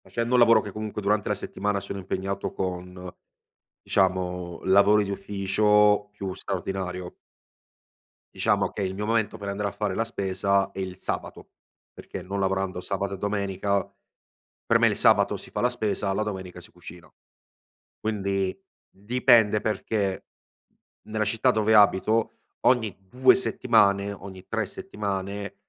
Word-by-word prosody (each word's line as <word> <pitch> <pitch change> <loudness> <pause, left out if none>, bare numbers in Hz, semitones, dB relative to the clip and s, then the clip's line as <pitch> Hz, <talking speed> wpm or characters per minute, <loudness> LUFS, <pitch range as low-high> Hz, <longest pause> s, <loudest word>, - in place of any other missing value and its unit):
Facendo 115 +1 -2
un 125 - +5
lavoro 115 -2 +6
che 105 - -7
comunque 105 +1 -5
durante 105 0 0
la - - +1
settimana 100 0 -2
sono 100 +1 -6
impegnato 95 +1 -3
con, 90 0 -5 0.8
diciamo 90 -2 0
lavori 100 +2 +5
di 100 - -5
ufficio 105 +1 +2
più 100 -2 -5
straordinario. 90 -2 -4 1.2
Diciamo - - +1
che - - -5
il 95 0 -2
mio 105 +2 -4
momento 110 -1 0
per 100 -1 -5
andare 100 +1 -2
a - - -3
fare 100 -1 -2
la 115 - -1
spesa 100 -1 0
è 95 - -8
il 95 -1 -4
sabato, - - -5 0.4
perché - - -8
non 95 +2 -4
lavorando 95 -1 -1
sabato 95 +1 -3
e - - -10
domenica, 100 0 -1 0.9
per - - +5
me - - +3
il - - +3
sabato - - +4
si - - -10
fa - - -3
la 125 - +3
spesa, 105 -4 -2
alla 95 +2 0
domenica 95 -4 -5
si 85 - -17
cucina. 90 0 -13 0.9
Quindi, 100 -3 -1 0.4
dipende, 110 0 +3
perché 105 -2 -2 0.8
nella 110 0 -1
città 115 +5 +2
dove 110 -1 +2
abito 105 +2 +4 0.3
ogni 115 -5 +3
2 130 +5 +5
settimane, 100 0 +2
ogni 95 -1 -10
3 110 -1 -2
settimane, 100 - -5
100 Hz, 145 wpm, -26 LUFS, 95-105 Hz, 1.2 s, lavoro